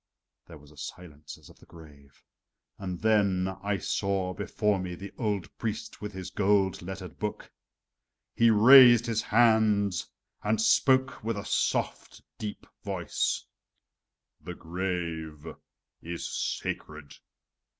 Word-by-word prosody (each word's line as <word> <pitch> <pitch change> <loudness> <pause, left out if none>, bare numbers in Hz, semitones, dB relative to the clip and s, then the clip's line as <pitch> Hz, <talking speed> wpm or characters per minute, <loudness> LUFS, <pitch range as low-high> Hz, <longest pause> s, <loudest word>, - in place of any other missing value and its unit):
There 80 - -11
was 75 0 -18
a 75 - -19
silence 75 0 -9
as - - -18
of - - -21
the - - -19
grave 75 -4 -17 0.6
and 90 -3 -5
then 100 -4 +2
I 100 0 -1
saw 95 0 -1
before 100 +1 -1
me 90 -1 -5
the 100 +3 -9
old 105 -7 -3
priest 110 -3 -5
with 105 0 -5
his 95 -1 -7
gold 100 0 +1
lettered 95 -1 -8
book. 105 0 -5 0.8
He 115 0 +4
raised 120 +2 +8
his 115 -2 0
hand 110 -4 +3 0.5
and 105 +1 0
spoke 130 +4 +3
with 115 -1 -2
a 100 - -6
soft, - - -2 0.2
deep 105 -1 -6 0.2
voice: - - -2 0.9
"The 90 +3 -8
grave 85 -3 -4 0.6
is 85 +1 -5
sacred! 75 -2 -4
95 Hz, 125 wpm, -28 LUFS, 85-105 Hz, 0.9 s, raised